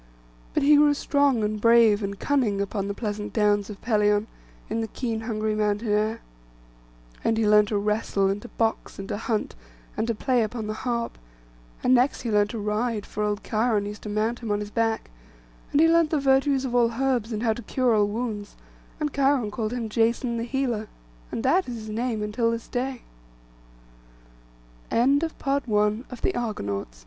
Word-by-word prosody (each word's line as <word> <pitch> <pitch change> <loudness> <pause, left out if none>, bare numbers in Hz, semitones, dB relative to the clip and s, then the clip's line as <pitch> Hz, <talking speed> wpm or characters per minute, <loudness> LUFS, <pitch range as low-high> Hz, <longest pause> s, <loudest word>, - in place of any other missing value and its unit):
But - - +2
he 295 +1 +6
grew 295 0 +5
strong, 280 -5 +2
and 210 0 -2
brave 230 -2 +5
and 200 0 -3
cunning, 245 -9 +1
upon 200 0 -2
the 200 - -3
pleasant 210 -2 -4
downs 205 -2 +2
of 205 -2 -8
Pelion, 210 -2 +2 0.4
in 225 +1 -2
the 225 - -2
keen 230 -1 -3
hungry 220 -1 -2
mountain 210 +1 0
air. 215 +2 +1 1.0
And 225 - +1
he 220 -1 +2
learnt 210 0 +5
to 210 - 0
wrestle, 205 -1 0
and 195 +1 -1
to 240 - -9
box, 225 -1 -2
and 195 - -6
to 205 - -2
hunt, 220 0 -2 0.4
and 225 - -1
to 230 - 0
play 250 +2 +1
upon 220 0 -3
the 215 - -3
harp; 235 +1 -3 0.6
and 250 - +4
next 255 +2 +3
he 235 - -3
learnt 210 0 +3
to 230 - -5
ride, 210 +1 -1
for 210 - -5
old 210 0 -1
Cheiron 220 -2 +1
used 205 0 -7
to 210 - -7
mount 220 +3 -1
him 230 - -6
on 205 0 +1
his 205 0 -6
back; 225 - -1 0.6
and 285 - +2
he 325 - +6
learnt 330 -1 +4
the 310 - +1
virtues 270 0 +2
of 250 - -3
all 235 -1 +3
herbs 250 -2 0
and 215 +1 -3
how 225 -2 +3
to 240 - -8
cure 250 +2 +1
all 210 -1 +3
wounds; 210 -2 -4 0.4
and 300 -2 -2
Cheiron 270 -5 +2
called 215 0 -3
him 240 -2 -3
Jason 235 +2 +1
the 230 - -2
healer, 240 -4 -1 0.4
and 225 - -3
that 345 +4 +2
is 240 - -4
his 220 -1 -8
name 225 0 -2
until 225 +2 0
this 230 0 -4
225 Hz, 180 wpm, -25 LUFS, 210-245 Hz, 1.0 s, he